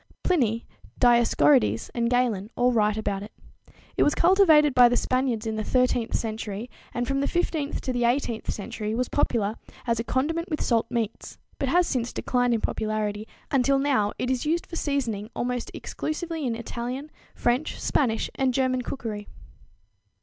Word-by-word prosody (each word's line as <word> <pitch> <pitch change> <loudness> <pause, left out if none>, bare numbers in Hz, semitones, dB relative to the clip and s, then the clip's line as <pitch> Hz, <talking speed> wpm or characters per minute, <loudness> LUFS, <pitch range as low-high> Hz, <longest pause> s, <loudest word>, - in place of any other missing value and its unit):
Pliny, 235 - +1 0.3
Dioscorides 150 - +4
and 235 -1 0
Galin 240 -5 +1
all 245 +1 +3
write 215 -2 +2
about 200 -2 -2
it. 205 - -9 0.7
It - - +2
was 295 - +4
cultivated 335 -6 +5
by 245 -1 +7
the 245 - +1
Spaniards 255 -3 0
in 220 -1 -2
the - - -1
13th 250 -1 +1
century, 220 0 -3 0.2
and 245 0 -2
from 275 +2 0
the 280 - +1
15th 315 -4 -1
to 260 - -2
the 245 - -1
18th 240 -1 0
century 210 +1 -3
was 250 +1 -1
popular 220 -6 0 0.3
as 230 -2 0
a - - 0
condiment 325 +9 -1
with 310 - -2
salt 230 -2 +1
meats, 230 -2 -3 0.2
but 275 - 0
has 355 +4 +4
since 245 -6 -1
declined 245 -1 +1
in 220 - -2
popularity, 215 -1 -2 0.2
until 275 0 +3
now 270 -7 +2
it 250 - -1
is 255 -2 -1
used 325 +3 0
for 335 - -8
seasoning 240 -10 -2
almost 245 0 -2
exclusively 320 -2 -4
in 230 - -1
Italian, 245 +5 -5 0.2
French, 245 +5 0
Spanish 230 -6 +1
and 260 -2 0
German 255 -1 +1
cookery. 220 -5 -5
245 Hz, 165 wpm, -26 LUFS, 220-275 Hz, 0.7 s, by